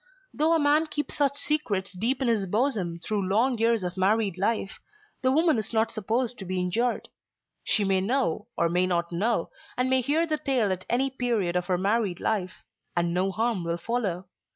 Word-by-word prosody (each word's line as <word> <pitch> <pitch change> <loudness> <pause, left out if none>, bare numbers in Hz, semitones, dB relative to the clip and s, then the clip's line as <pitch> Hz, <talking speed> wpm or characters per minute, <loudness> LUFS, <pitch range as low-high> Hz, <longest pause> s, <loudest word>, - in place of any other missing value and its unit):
Though 315 +2 +2
a - - +3
man 300 +2 +3
keep 295 -2 -2
such 280 -1 0
secrets 215 -12 0
deep 240 +8 0
in - - 0
his 215 -4 +1
bosom 205 -5 0
through 200 +2 -2
long 230 +5 +2
years 230 -2 +2
of 180 +1 -4
married 200 0 +2
life, 200 +1 -1 0.4
the 260 - +2
woman 315 -3 +3
is 215 - -4
not 220 0 +2
supposed 230 +3 -2
to 195 - -6
be 185 0 -2
injured. 225 +7 -1 0.6
She 210 - +2
may 190 -1 +2
know, 215 -3 0
or 170 - +3
may 180 +2 +1
not 170 -1 -1
know, 215 +7 0 0.3
and 255 +1 +1
may 260 0 +4
hear 300 +6 +1
the 310 -2 -1
tale 250 -8 +1
at 185 0 -4
any 265 +3 +1
period 235 -9 -1
of 180 0 0
her 180 - +1
married 200 -1 0
life, 190 -4 -2 0.3
and 170 0 +1
no 185 +2 +1
harm 220 -2 -1
will 170 0 -2
follow. 190 -2 -2
220 Hz, 200 wpm, -26 LUFS, 185-255 Hz, 0.6 s, may